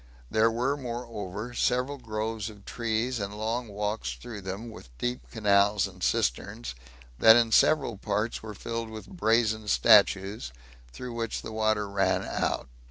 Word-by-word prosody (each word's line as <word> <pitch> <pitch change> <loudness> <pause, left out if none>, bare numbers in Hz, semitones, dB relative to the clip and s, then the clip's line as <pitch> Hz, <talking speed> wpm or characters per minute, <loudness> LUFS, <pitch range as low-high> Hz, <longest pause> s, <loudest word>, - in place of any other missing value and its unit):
There 110 +1 +4
were, 125 +5 0
moreover, 115 -4 -5
several 125 +4 0
groves 110 -2 -3
of 105 -2 -14
trees, 115 +1 -1
and 100 0 -4
long 115 +3 -2
walks 105 - -3
through 105 - -8
them, 100 +5 -6
with 85 - -12
deep 120 +1 -3
canals, 100 -3 +3
and 95 -2 -10
cisterns, - - -1 0.5
that 110 0 +9
in 115 -1 +3
several 135 -4 +4
parts 105 +2 -1
were 110 -1 -8
filled 115 +2 -4
with 110 -1 -8
brazen 110 -6 +2
statues, 100 - +4 0.4
through 125 - -7
which 115 -1 -3
the - - -6
water 110 -1 +1
ran 100 -1 +1
out. - - -1
110 Hz, 150 wpm, -28 LUFS, 100-115 Hz, 0.5 s, that